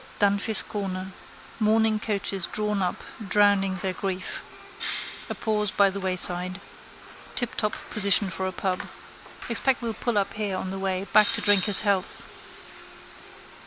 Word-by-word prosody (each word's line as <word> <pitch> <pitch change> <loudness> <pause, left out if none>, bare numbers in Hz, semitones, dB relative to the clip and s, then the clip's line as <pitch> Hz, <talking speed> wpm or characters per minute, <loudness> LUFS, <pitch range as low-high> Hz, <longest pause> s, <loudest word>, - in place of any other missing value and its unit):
Dunphy's 200 +1 +2
corner. 190 -2 -4 0.5
Mourning 220 0 +3
coaches 200 -4 -1
drawn 210 -1 -1
up, 180 -1 -2 0.3
drowning 200 -1 +3
their 190 -1 0
grief. 185 0 -3 0.9
A - - -3
pause 210 -2 0
by 200 0 +4
the 200 - -4
wayside. 185 0 -1 0.8
Tiptop 225 -3 0 0.2
position 200 -2 +2
for 190 +2 -3
a - - -2
pub. 185 0 -2 0.7
Expect 250 +2 +1
we'll 230 -1 -1
pull 235 0 -1
up 200 - 0
here 205 -3 -2
on 185 - -4
the 195 - -4
way 190 -1 -1
back 210 -1 +7
to - - +1
drink 205 -3 +4
his 205 -2 +6
health. 200 -3 0
200 Hz, 140 wpm, -26 LUFS, 190-210 Hz, 0.9 s, back